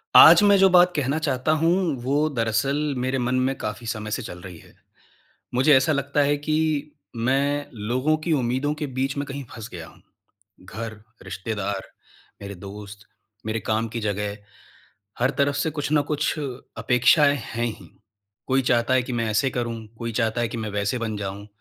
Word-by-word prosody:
आज - - +10
मैं 200 0 +6
जो 195 0 +6
बात 180 0 +6
कहना 145 0 0
चाहता 130 0 0
हूँ, 165 -4 +1
वो 145 +5 +1
दरअसल 115 +2 0 0.2
मेरे 130 +2 -1
मन 125 0 0
में 130 +1 +1
काफ़ी 105 +2 -5
समय 110 -1 -4
से 130 - -1
चल 100 -7 -8
रही 90 -2 -9
है। - - -18 0.8
मुझे 135 +4 +5
ऐसा 135 +4 +3
लगता 140 0 0
है 145 +1 +2
कि 155 0 -1 0.2
मैं 140 +5 0 0.2
लोगों 130 +6 +2
की 165 - +1
उम्मीदों 130 +1 0
के 150 -1 -4
बीच 135 +1 -1
में 140 0 -2
कहीं 140 +1 -5
फंस 115 0 -8
गया 85 -2 -7
हूँ। - - -18 0.6
घर, 110 +3 -6 0.3
रिश्तेदार, 100 -1 -4 0.5
मेरे 100 0 -6
दोस्त, 100 +2 -10 0.4
मेरे 110 0 -1
काम 110 +1 0
की 115 +1 -5
जगह, 105 -1 -2 0.8
हर 125 +2 +2
तरफ 140 0 +2
से 145 +3 0
कुछ 145 -1 -3
न 150 - +4
कुछ 150 0 0
अपेक्षाएँ 135 +1 +2 0.2
हैं 120 +1 -1
ही। 115 - -7 0.6
कोई 135 0 +2
चाहता 120 +2 +2
है 130 - +3
कि 125 - -6
मैं 115 -1 -1
ऐसे 120 +5 +1
करूँ, 115 -2 -4
कोई 115 -1 -4
चाहता 115 0 0
है 120 - 0
कि 115 - -6
मैं 105 - -4
वैसे 105 +3 -1
बन 110 -2 -3
जाऊँ। 100 0 -5
125 Hz, 185 wpm, -24 LUFS, 110-145 Hz, 0.8 s, आज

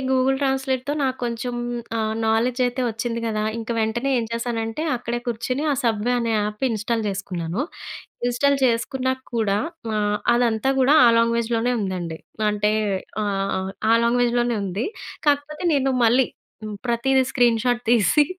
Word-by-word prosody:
Google 265 +1 +3
ట్రాన్స్లేట్తో 265 0 0
నాకు 260 -1 0
కొంచెం 240 +1 -3 0.4
ఆ - - 0 0.3
నాలెడ్జ్ 235 +3 +1
అయితే 245 +1 -3
వచ్చింది 230 +1 -3
కదా! 215 -1 -1 0.2
ఇంక 225 +1 -6
వెంటనే 235 +5 0
ఏం 230 - -1
చేశానంటే, 230 +3 -2
అక్కడే 240 0 -3
కూర్చొని 240 +4 -2
ఆ - - +1
'సబ్వే' 230 +1 +1
అనే 230 -1 0
యాప్ 210 +4 -2
ఇన్స్టాల్ 225 +1 -1
చేసుకున్నాను. 190 0 -3 0.7
ఇన్స్టాల్ 280 +4 +2
చేసుకున్నాక 260 +2 -1
కూడా, 205 -3 +1 0.4
ఆహ్, 210 0 +1 0.2
అదంతా 235 +1 +2
కూడా 265 +3 +5
ఆ - - +8
లాంగ్వేజ్‌లోనే 230 +1 +1
ఉందండి. 180 -5 -3 0.3
అంటే 210 0 +1 0.5
ఆహ్, 195 -1 -1 0.2
ఆ - - +6
లాంగ్వేజ్‌లోనే 240 0 +2
ఉంది. 195 +5 -2 0.4
కాకపోతే 290 +2 0
నేను 270 -1 +2
మళ్ళీ 245 +3 +4 0.6
ప్రతీదీ 260 +3 +2
స్క్రీన్ 235 -3 +3
షాట్ 245 -1 +1
తీసి, 240 - +4
235 Hz, 135 wpm, -23 LUFS, 220-255 Hz, 0.7 s, ఆ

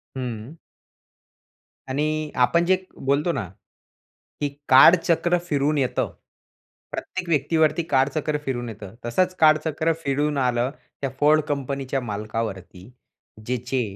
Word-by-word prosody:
हं. 125 +4 -6 1.3
आणि 150 +3 -1
आपण 170 +7 +1
जे 185 +1 +4 0.2
बोलतो 140 +5 0
ना, 105 - -3 0.9
की 145 - +1 0.2
काळचक्र 170 +5 +6
फिरून 150 -1 +1
येतं. 130 -3 0 0.8
प्रत्येक 185 -2 -5
व्यक्तीवरती 155 +2 +2
काळचक्र 140 +3 +1
फिरून 120 -3 -3
येतं. 105 -1 -10
तसंच 185 +10 +1
कालचक्र 155 +1 +3
फिरून 145 +1 0
आलं 125 0 +1 0.3
त्या 135 - -1
Ford 155 +1 +5
कंपनीच्या 135 -2 -2
मालकावरती. 105 -3 -5 0.6
ज्याचे 125 +1 -1
140 Hz, 105 wpm, -23 LUFS, 125-155 Hz, 1.3 s, काळचक्र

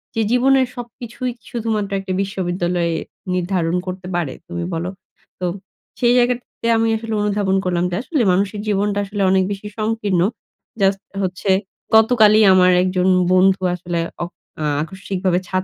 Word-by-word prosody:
যে, 225 - +1
"জীবনের 260 +1 +4
সবকিছুই 245 +1 -6 0.2
শুধুমাত্র 220 -3 -2
একটি 195 -1 -4
বিশ্ববিদ্যালয়ে 175 -3 -1 0.4
নির্ধারণ 180 -2 0
করতে 185 0 -5
পারে? 165 -6 -1
তুমি 175 0 -4
বলো?" 165 +2 -2 0.5
তো, 180 - -2 0.5
সেই 240 0 +4
জায়গাটাতে, 245 -1 0
আমি 225 0 +2
আসলে 225 0 -5
অনুধাবন 205 -2 +1
করলাম 175 -1 0
যে, - - -1
আসলে 295 -1 0
মানুষের 200 +3 0
জীবনটা 205 0 +1
আসলে 200 +1 -4
অনেক 190 0 +4
বেশি 200 +1 -5
সংকীর্ণ। 215 -4 0 0.6
জাস্ট 195 0 +2 0.2
হচ্ছে 185 +2 -3 0.5
গতকালই 220 -1 +6
আমার 185 -1 +5
একজন 185 0 +1 0.3
বন্ধু 190 +1 +4
আসলে 175 -1 -3 0.2
অক 175 - -6 0.5
আকস্মিকভাবে 185 0 -2
ছাদ 185 0 -1
195 Hz, 140 wpm, -20 LUFS, 180-220 Hz, 0.6 s, গতকালই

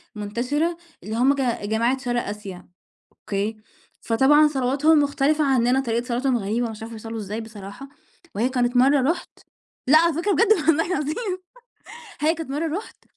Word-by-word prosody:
منتشِرة 250 +11 -2 0.3
اللي 215 +2 -5
هُم 255 +4 +4
ج 275 - -2 0.3
جماعة 230 +4 +1
شرق 245 -2 -2
آسيا، 200 -3 -8 0.5
أوكي، 205 +2 -3 0.4
فطبعًا 280 +6 +4
صلواتهم 280 +3 +2
مختلِفة 285 +2 +1
عنّنا، 260 -1 +2
طريقة 235 -2 -1
صلاتهم 250 +1 0
غريبة، 225 +3 -2
مش 220 0 -9
عارفة 225 +1 -7
بيصلّوا 225 +1 -7
إزاي 210 +1 -5
بصراحة. 220 +3 -10 0.5
وهي 230 +5 +1
كانت 250 -1 0
مرّة 270 +2 +4
رُحت 345 - -3 0.6
لأ، 300 +4 +7
على 335 +1 +3
فكرة 355 +6 0
بجد 455 +2 +4
والله 325 -4 +2
العظيم 365 - -2 0.8
هي 310 +2 +3
كانت 325 -4 -7
مرّة 315 +4 -2
رُحت 430 - -11
260 Hz, 155 wpm, -23 LUFS, 225-300 Hz, 0.8 s, لأ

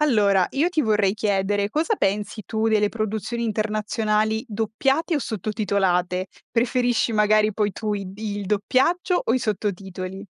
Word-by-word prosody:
Allora, 205 -10 +3
io 300 +5 +1
ti 355 -3 0
vorrei 210 -6 +2
chiedere: 205 -1 0
cosa 325 - 0
pensi 205 - -1
tu 220 0 0
delle 210 -1 +3
produzioni 220 +2 -3
internazionali 215 0 0
doppiate 270 - 0
o - - +1
sottotitolate? 190 -5 -1 0.2
Preferisci 245 0 +1
magari 215 0 +3
poi 205 -1 0
tu 215 -2 -3
i 195 -2 -5
il 205 -2 -4
doppiaggio 265 - +1
o - - +1
i - - +2
sottotitoli? 195 -3 -4
215 Hz, 140 wpm, -23 LUFS, 200-230 Hz, 0.2 s, Allora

